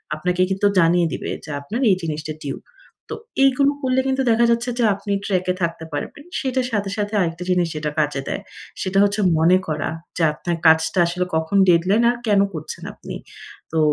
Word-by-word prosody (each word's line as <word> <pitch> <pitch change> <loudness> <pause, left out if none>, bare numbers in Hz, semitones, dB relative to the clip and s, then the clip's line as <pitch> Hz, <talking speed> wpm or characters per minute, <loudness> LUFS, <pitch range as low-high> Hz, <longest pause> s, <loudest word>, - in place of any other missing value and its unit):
আপনাকে 180 +3 -1
কিন্তু 190 +1 0
জানিয়ে 170 0 +4
দিবে - - -4
যে - - -11
আপনার 220 - -4
এই 190 - +5
জিনিসটা 155 -1 -4
টিউব। 140 - -5 0.5
তো - - -3 0.3
এইগুলো 275 +1 +4
করলে 260 -1 +1
কিন্তু 265 0 +1
দেখা 235 +1 +4
যাচ্ছে 235 +2 0
যে - - +3
আপনি 200 +1 -6
ট্র্যাক 185 -2 0
এ - - 0
থাকতে 165 -1 -2
পারবেন। 145 - -5 0.2
সেটার 260 -2 -1
সাথে, 205 -3 -1
সাথে 205 0 -2
আরেকটা 170 -1 -1
জিনিস 180 -1 +2
যেটা 150 0 -2
কাজে 145 -2 0
দেয়। - - -3 0.4
সেটা 190 +1 -1
হচ্ছে 205 +1 +1 0.2
মনে 170 +3 +5
করা 155 -1 -2 0.3
যে 170 - +1
আপনার 170 +3 -3
কাজটা 160 +3 +4
আসলে 180 +1 -1
কখন 160 +5 0
ডেডলাইন 180 +6 +3
আর 240 - -5
কেন 205 -2 +4
করছেন 155 -1 -7
আপনি। - - -9 0.6
তো 160 - +1
180 Hz, 190 wpm, -21 LUFS, 160-210 Hz, 0.6 s, এই